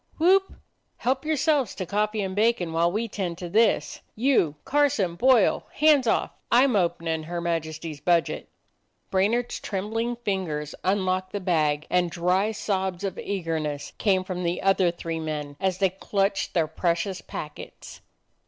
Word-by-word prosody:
Whoop! 380 Hz, +4 st, +3 dB, 0.4 s
Help 260 Hz, +3 st, -1 dB
yourselves 300 Hz, -, +1 dB
to 185 Hz, -, -4 dB
coffee 210 Hz, +2 st, 0 dB
and 190 Hz, -1 st, -4 dB
bacon 210 Hz, -6 st, +1 dB
while 170 Hz, +1 st, +2 dB
we 220 Hz, +4 st, -1 dB
tend 185 Hz, -5 st, -4 dB
to 180 Hz, -, -6 dB
this. 220 Hz, +6 st, +2 dB
You, 225 Hz, -, +2 dB
Carson, 265 Hz, -11 st, +2 dB
Boyle 240 Hz, +2 st, +3 dB
— -, -, -28 dB
hands 295 Hz, -4 st, +4 dB
off! -, -, +1 dB, 0.2 s
I 245 Hz, +2 st, +6 dB
*m 265 Hz, -5 st, +2 dB
openin' 165 Hz, -4 st, 0 dB
her 175 Hz, +1 st, -4 dB
Majesty's 160 Hz, -2 st, -3 dB
budget." 170 Hz, -3 st, +1 dB, 0.6 s
Brainard 220 Hz, +6 st, +1 dB
's -, -, -4 dB
trembling 225 Hz, +4 st, -2 dB
fingers 185 Hz, -10 st, -3 dB
unlocked 185 Hz, -1 st, 0 dB
the 205 Hz, -, -1 dB
bag, 155 Hz, -5 st, +1 dB
and 180 Hz, -1 st, +2 dB
dry 180 Hz, +5 st, +1 dB
sobs 190 Hz, -3 st, -2 dB
of 195 Hz, -2 st, -3 dB
eagerness 160 Hz, -6 st, -3 dB
came 190 Hz, -3 st, +2 dB
from 185 Hz, -1 st, -4 dB
the 175 Hz, 0 st, -2 dB
other 195 Hz, -2 st, +4 dB
three 165 Hz, -1 st, -4 dB
men 150 Hz, -2 st, -4 dB
as 190 Hz, -2 st, 0 dB
they 195 Hz, -2 st, +2 dB
clutched 195 Hz, +1 st, -1 dB
their 165 Hz, -2 st, +3 dB
pre 170 Hz, +2 st, 0 dB
cious 190 Hz, +2 st, -4 dB
packets. 150 Hz, -1 st, -9 dB
190 Hz, 160 wpm, -25 LUFS, 170-220 Hz, 0.6 s, I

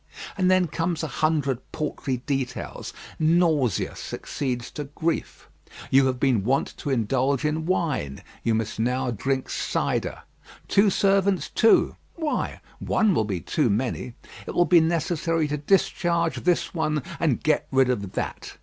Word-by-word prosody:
And 185 Hz, -2 st, +2 dB
then 185 Hz, -1 st, +4 dB
come 165 Hz, +1 st, -2 dB
a -, -, +1 dB
hundred 150 Hz, -5 st, 0 dB
paltry 145 Hz, -4 st, -3 dB
details. 135 Hz, -3 st, -3 dB, 0.3 s
Nausea 155 Hz, -, +2 dB
succeeds 125 Hz, -3 st, -4 dB
to 150 Hz, -, -5 dB
grief. 160 Hz, +4 st, -3 dB, 0.4 s
You 135 Hz, 0 st, +5 dB
have 130 Hz, -1 st, -1 dB
been 125 Hz, -7 st, +2 dB
wont 130 Hz, +6 st, 0 dB
to -, -, -5 dB
indulge 130 Hz, +3 st, +1 dB
in 155 Hz, +1 st, -1 dB
wine; 150 Hz, -, -1 dB, 0.2 s
you 115 Hz, -, +1 dB
must 110 Hz, -1 st, -3 dB
now 125 Hz, +2 st, 0 dB
drink 130 Hz, +4 st, -1 dB
cider. -, -, -2 dB, 0.4 s
Two 200 Hz, +1 st, +4 dB
servants, 195 Hz, -3 st, +2 dB
too! 225 Hz, -, +4 dB, 0.2 s
Why, 315 Hz, -3 st, -2 dB, 0.2 s
one 215 Hz, -3 st, +2 dB
will 110 Hz, -, +1 dB
be 95 Hz, -5 st, -3 dB
too 150 Hz, -7 st, +1 dB
many. 120 Hz, +2 st, -2 dB, 0.3 s
It -, -, -5 dB
will 175 Hz, -, +4 dB
be 175 Hz, -1 st, +6 dB
necessary 165 Hz, -1 st, 0 dB
to 150 Hz, -, -1 dB
discharge 170 Hz, 0 st, +1 dB
this 180 Hz, -1 st, +1 dB
one, 155 Hz, -4 st, 0 dB, 0.2 s
and 155 Hz, -8 st, +1 dB
get 155 Hz, -, +1 dB
rid 130 Hz, -1 st, +4 dB
of 100 Hz, -6 st, -3 dB
that. -, -, -5 dB
150 Hz, 150 wpm, -25 LUFS, 130-170 Hz, 0.4 s, be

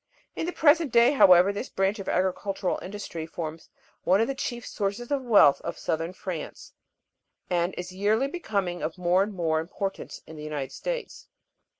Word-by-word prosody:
In 325 Hz, -, -3 dB
the -, -, -1 dB
present 315 Hz, -3 st, +3 dB
day, 235 Hz, +2 st, +6 dB
however, 190 Hz, -7 st, +6 dB
this 205 Hz, +5 st, -5 dB
branch 195 Hz, +2 st, 0 dB
of 195 Hz, -, -5 dB
agricultural 190 Hz, +1 st, -1 dB
industry 185 Hz, -5 st, -6 dB
forms 160 Hz, -1 st, -7 dB, 0.3 s
one 190 Hz, +3 st, +4 dB
of 225 Hz, -, +3 dB
the 275 Hz, -, -2 dB
chief 240 Hz, -3 st, -4 dB
sources 210 Hz, +5 st, -3 dB
of 280 Hz, -2 st, +1 dB
wealth 210 Hz, -, +5 dB
of 170 Hz, -, -5 dB
southern 165 Hz, +2 st, -2 dB
France; 185 Hz, -3 st, -7 dB, 0.8 s
and 175 Hz, +1 st, 0 dB
is 180 Hz, +1 st, -5 dB
yearly 210 Hz, +6 st, +1 dB
becoming 200 Hz, -, -3 dB
of 160 Hz, +4 st, -3 dB
more 180 Hz, +1 st, +3 dB
and 205 Hz, +2 st, -1 dB
more 165 Hz, -4 st, 0 dB
importance 195 Hz, +4 st, -5 dB
in 160 Hz, -, -11 dB
the 150 Hz, -, -8 dB
United 150 Hz, -3 st, -4 dB
States. -, -, -5 dB
195 Hz, 175 wpm, -26 LUFS, 175-230 Hz, 0.8 s, day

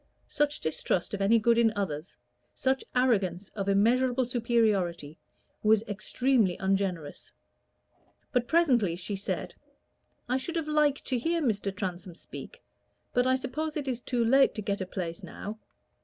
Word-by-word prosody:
Such 295 Hz, 0 st, 0 dB
distrust 160 Hz, +4 st, -1 dB
of 200 Hz, -, -3 dB
any 210 Hz, +4 st, +5 dB
good 230 Hz, +1 st, +3 dB
in 225 Hz, -1 st, +4 dB
others, 175 Hz, -5 st, -4 dB, 0.4 s
such 265 Hz, 0 st, 0 dB
arrogance 200 Hz, -7 st, +1 dB
of 200 Hz, -2 st, -3 dB
immeasurable 245 Hz, +5 st, +3 dB
superiority, 215 Hz, -, 0 dB, 0.4 s
was 215 Hz, 0 st, +4 dB
extremely 215 Hz, -1 st, +1 dB
ungenerous. 190 Hz, -6 st, -2 dB, 1.0 s
But 250 Hz, -3 st, +1 dB
presently 250 Hz, -, +3 dB
she 185 Hz, +3 st, -4 dB
said 195 Hz, -, -3 dB, 0.7 s
"I 255 Hz, +1 st, +1 dB
should 295 Hz, +6 st, -4 dB
have 325 Hz, -2 st, -1 dB
liked 300 Hz, -2 st, +2 dB
to 255 Hz, -, 0 dB
hear 335 Hz, +7 st, 0 dB
Mr. 210 Hz, -9 st, 0 dB
Transome 180 Hz, -3 st, -5 dB
speak, -, -, -10 dB, 0.5 s
but 245 Hz, +1 st, +3 dB
I 260 Hz, -, +4 dB
suppose 300 Hz, +5 st, -3 dB
it 285 Hz, -2 st, -4 dB
is 250 Hz, -2 st, -2 dB
too 240 Hz, -2 st, 0 dB
late 270 Hz, +4 st, +5 dB
to 215 Hz, -, -4 dB
get 200 Hz, 0 st, -2 dB
a 185 Hz, -, -3 dB
place 170 Hz, -3 st, -5 dB
now." 215 Hz, +2 st, -7 dB
225 Hz, 150 wpm, -29 LUFS, 195-260 Hz, 1.0 s, any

